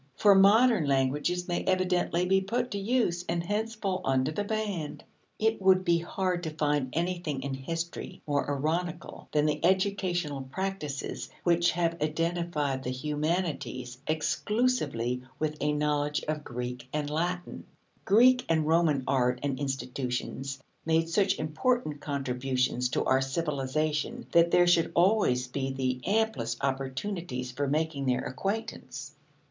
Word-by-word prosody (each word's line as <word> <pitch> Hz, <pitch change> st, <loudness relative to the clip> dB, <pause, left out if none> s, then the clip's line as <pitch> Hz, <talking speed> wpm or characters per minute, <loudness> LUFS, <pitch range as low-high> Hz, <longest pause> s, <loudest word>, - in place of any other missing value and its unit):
For 205 Hz, +8 st, +6 dB
modern 205 Hz, -, +5 dB
languages 145 Hz, +6 st, +1 dB
may 175 Hz, -1 st, -1 dB
evidently 180 Hz, -1 st, +1 dB
be 190 Hz, +1 st, +3 dB
put 240 Hz, +6 st, -2 dB
to 200 Hz, -, -2 dB
use, 200 Hz, -5 st, +1 dB
and 170 Hz, 0 st, 0 dB
hence 215 Hz, +5 st, -2 dB
fall 195 Hz, -4 st, -2 dB
under 130 Hz, +2 st, +1 dB
the 180 Hz, +6 st, -2 dB
ban. 205 Hz, -7 st, -3 dB, 0.4 s
It 220 Hz, -1 st, +1 dB
would 185 Hz, -1 st, +4 dB
be 170 Hz, -1 st, +3 dB
hard 180 Hz, +1 st, -1 dB
to 165 Hz, -, -3 dB
find 150 Hz, -3 st, 0 dB
anything 170 Hz, -5 st, -2 dB
in 140 Hz, -1 st, -3 dB
history 165 Hz, +6 st, -5 dB
more 145 Hz, -1 st, 0 dB
ironical 155 Hz, +5 st, -2 dB
than 150 Hz, 0 st, +2 dB
the 150 Hz, +1 st, 0 dB
educational 180 Hz, -5 st, +1 dB
practices 150 Hz, 0 st, -4 dB
which 170 Hz, 0 st, +3 dB
have 170 Hz, -1 st, -1 dB
identified 155 Hz, -3 st, -1 dB
the 125 Hz, -, -4 dB
"humanities" 145 Hz, -2 st, -2 dB
exclusively 155 Hz, -, 0 dB, 0.2 s
with 155 Hz, -1 st, -1 dB
a 150 Hz, -, +2 dB
knowledge 150 Hz, 0 st, 0 dB
of 155 Hz, -1 st, -2 dB
Greek 125 Hz, 0 st, -5 dB
and 150 Hz, -1 st, -1 dB
Latin. 175 Hz, +4 st, -3 dB, 0.4 s
Greek 250 Hz, +5 st, +5 dB
and 160 Hz, -2 st, +2 dB
Roman 160 Hz, -4 st, +3 dB
art 125 Hz, -2 st, +1 dB
and 140 Hz, -2 st, -1 dB
institutions 135 Hz, 0 st, -3 dB, 0.2 s
made 165 Hz, 0 st, +2 dB
such 190 Hz, +3 st, +2 dB
important 155 Hz, -, 0 dB
contributions 130 Hz, -2 st, -1 dB
to -, -, 0 dB
our 130 Hz, 0 st, +3 dB
civilization 150 Hz, -, -1 dB
that 170 Hz, 0 st, +5 dB
there 175 Hz, +1 st, +5 dB
should 175 Hz, -1 st, +3 dB
always 170 Hz, -, +3 dB
be 135 Hz, +1 st, -2 dB
the 130 Hz, -1 st, -1 dB
amplest 200 Hz, -, 0 dB
opportunities 135 Hz, 0 st, -3 dB
for 140 Hz, +3 st, -2 dB
making 150 Hz, -1 st, -1 dB
their 125 Hz, -1 st, +2 dB
acquaintance. 195 Hz, -, -4 dB
155 Hz, 140 wpm, -29 LUFS, 135-185 Hz, 0.4 s, For